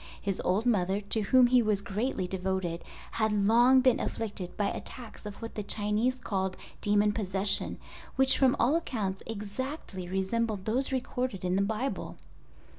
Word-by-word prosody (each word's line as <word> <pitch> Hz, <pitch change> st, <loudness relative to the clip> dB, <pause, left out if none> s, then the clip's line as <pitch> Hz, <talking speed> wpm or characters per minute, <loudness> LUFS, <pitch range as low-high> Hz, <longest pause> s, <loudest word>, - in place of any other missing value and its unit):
His 195 Hz, -2 st, -2 dB
old 195 Hz, +5 st, +1 dB
mother, 195 Hz, -4 st, +2 dB
to 210 Hz, +2 st, 0 dB
whom 250 Hz, +5 st, +5 dB
he 250 Hz, 0 st, +5 dB
was 210 Hz, -3 st, +1 dB
greatly 200 Hz, -2 st, -2 dB
devoted, 185 Hz, -2 st, -2 dB, 0.3 s
had 220 Hz, -1 st, +1 dB
long 235 Hz, +6 st, +5 dB
been 255 Hz, -2 st, +4 dB
afflicted 205 Hz, -5 st, -4 dB
by 205 Hz, -1 st, +1 dB
attacks 235 Hz, -4 st, -7 dB
of 205 Hz, -, -7 dB
what 230 Hz, -, -6 dB
the 210 Hz, -, -3 dB
Chinese 210 Hz, +5 st, 0 dB
called 190 Hz, -4 st, -2 dB, 0.2 s
demon 205 Hz, 0 st, +3 dB
possession—which 205 Hz, +6 st, 0 dB
from 265 Hz, -2 st, +4 dB
all 275 Hz, +6 st, +3 dB
accounts 210 Hz, -, -2 dB
exactly 210 Hz, -, -5 dB
resembled 195 Hz, +2 st, -1 dB
those 255 Hz, +5 st, 0 dB
recorded 250 Hz, -6 st, -2 dB
in 180 Hz, 0 st, +1 dB
the 195 Hz, -, +2 dB
Bible. 220 Hz, +6 st, -2 dB
210 Hz, 150 wpm, -29 LUFS, 195-245 Hz, 0.3 s, whom